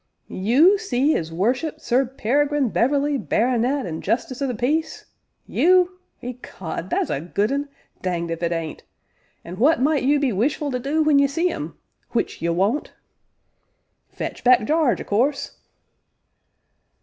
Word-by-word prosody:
"You 280 - +4
see 275 +2 +1
'is 160 0 -2
Worship 245 - -1
Sir 255 +1 +1
Peregrine 275 +2 0
Beverley, 280 +5 +1
Baronet, 250 +4 0
an' 160 -3 -5
Justice 240 +5 -2
o' 275 - +1
the 250 - -2
Peace 300 +8 -1 0.4
you? 365 +1 +3 0.2
Ecod! 190 -8 -6
that's - - 0
a 140 - -1
good 200 +6 -1
un 280 +1 -2 0.3
danged 170 -2 -2
if 165 - -4
it 170 0 0
ain't! 165 -2 -4 0.6
An' 175 +2 -8
what 305 +7 +4
might 290 +2 +2
you 285 +3 +3
be 270 -5 +1
wishful 280 +8 0
to 250 - -2
do 290 +5 0
when 300 -2 +4
ye 280 - +4
see 330 +6 0
'im 155 - -6 0.4
which 235 - -2
ye 170 - 0
won't?" 195 - 0 1.2
"Fetch - - -6
back 245 -3 +5
Jarge, 310 -1 +2
o' - - -4
course." 275 +7 -1
255 Hz, 150 wpm, -22 LUFS, 205-290 Hz, 1.2 s, back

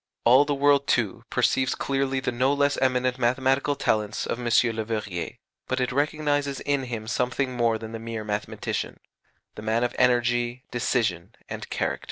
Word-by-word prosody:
All 130 +4 +7
the 145 0 0
world, 140 0 +3
too, 110 -5 0
perceives 130 0 +1
clearly 135 -1 -1
the 130 - -2
no 130 +3 +2
less 145 0 +2
eminent 125 -1 +1
mathematical 135 +3 +2
talents 105 -5 0
of 120 - -3
M. 120 - -5 0.3
Leverrier, 105 -5 -3 0.3
but 130 - -1
it 125 - 0
recognizes 145 0 0
in 140 -2 0
him 115 -3 -5
something 125 +3 -1
more 115 -2 +2
than 110 0 -8
the 115 - -6
mere 115 -1 -5
mathematician 105 0 -3 0.5
the - - -9
man 110 +2 0
of 120 - -1
energy, 120 0 +2
decision, 115 -8 -1
and - - -6
character. - - -1
125 Hz, 165 wpm, -25 LUFS, 115-135 Hz, 0.5 s, All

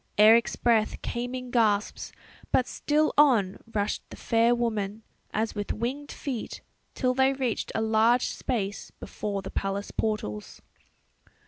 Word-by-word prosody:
Eric's 220 +2 +6
breath 225 -3 +2
came 245 +1 -3
in 250 -1 -6
gasps; 215 -4 +1 0.4
but 255 - +3
still 305 +1 +1
on 225 -10 +4
rushed 205 -1 -1
the - - -9
fair 230 +1 +2
woman, 220 -3 -2 0.3
as 220 +1 -1
with 205 -1 -4
winged 265 +6 -4
feet, 255 -6 -5 0.3
till 255 -1 +1
they 265 +1 +3
reached 260 -4 -2
a 220 - +1
large 225 +3 +3
space 205 -5 -3
before 200 -2 -5
the 190 - -7
palace 195 +1 -3
portals. 160 - -3
225 Hz, 135 wpm, -27 LUFS, 205-250 Hz, 0.4 s, Eric's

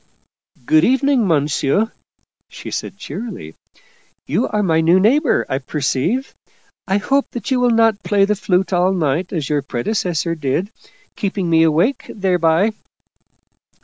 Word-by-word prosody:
" 125 - -35
Good 155 0 +6
evening, 265 -1 +2
Monsu," 150 - +1 0.6
she - - -9
said - - -5
cheerily. 190 - -7 0.4
" - - -37
You - - +2
are 210 -1 -1
my 160 -4 +2
new 170 +3 +4
neighbor, 260 - +2
I 130 - -2
perceive. 150 - -2 0.5
I 195 - +2
hope 275 +7 0
that 240 +1 -5
you 260 - +2
will 245 0 +3
not 225 -3 +3
play 200 -1 +2
the 210 +1 0
flute 190 -1 0
all 180 +2 +2
night 165 0 -1
as 155 -7 -3
your 150 -1 0
predecessor 165 - -2
did, 160 +6 -2 0.4
keeping 195 -4 -2
me 160 0 +5
awake 165 - +1
thereby." 180 0 +1
185 Hz, 145 wpm, -18 LUFS, 160-220 Hz, 0.6 s, Good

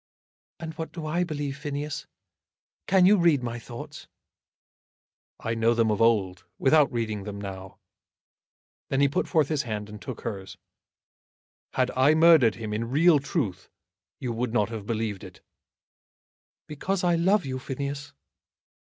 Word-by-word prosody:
"And 160 -1 -6
what 160 - -4
do 165 -3 -7
I 170 +3 0
believe, 145 -4 -4
Phineas? 145 0 -4 0.8
Can 190 -1 +5
you 205 +3 +6
read 165 -7 +3
my 120 0 -4
thoughts?" 120 0 -9 1.3
"I 115 - -2
know 115 +1 +2
them 115 -1 +2
of 105 - -1
old, 100 -6 +2
without 145 +1 +4
reading 110 -4 -2
them 100 0 -6
now." 95 -1 -8 1.1
Then 135 - 0
he 140 - +5
put 140 - -1
forth 155 -5 +2
his 155 -3 +1
hand 105 -5 -5
and 105 0 -10
took - - -7
hers. 95 -4 -6 1.2
"Had 130 -1 +1
I 135 +4 +5
murdered 160 -9 +6
him 110 -2 -5
in 115 +2 -2
real 155 +3 +5
truth, 135 - -3 0.5
you 125 -3 -3
would 115 0 -2
not 105 -3 +2
have 110 -3 -7
believed 110 -4 -2
it." - - -12 1.2
"Because 180 +6 -3
I 175 -1 +3
love 185 +3 +2
you, 130 -1 -3
Phineas." 140 +2 -5
130 Hz, 150 wpm, -26 LUFS, 110-155 Hz, 1.3 s, you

